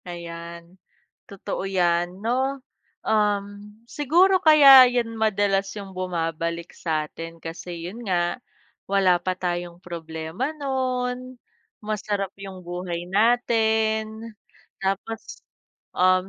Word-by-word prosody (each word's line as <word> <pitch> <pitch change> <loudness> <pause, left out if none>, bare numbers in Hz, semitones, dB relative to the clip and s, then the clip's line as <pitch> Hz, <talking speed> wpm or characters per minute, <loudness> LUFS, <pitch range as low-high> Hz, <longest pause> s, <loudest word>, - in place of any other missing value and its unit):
Ayan, 170 0 -9 0.4
totoo 200 -1 -5
yan, 175 -1 0
'no. 260 +5 0 0.4
Um, 205 0 -1
siguro 345 +8 +3
kaya 280 -4 +10
yan 240 -2 0
madalas 200 -3 +1
yung 195 -3 -9
bumabalik 170 -2 -3
sa 155 -2 -2
'tin 165 0 -9
kasi 170 +1 -7
yun 230 +6 -9
nga 175 -2 0 0.5
wala 190 -2 +3
pa 185 +2 -2
tayong 175 -1 -4
problema 165 - -5
no'n, 255 -3 -3 0.4
masarap 210 -2 -2
yung 195 -1 -8
buhay 175 0 -5
natin. 220 0 +1 0.4
Tapos, 195 +4 -4 0.6
um, 185 +1 +3
195 Hz, 100 wpm, -24 LUFS, 175-225 Hz, 0.6 s, kaya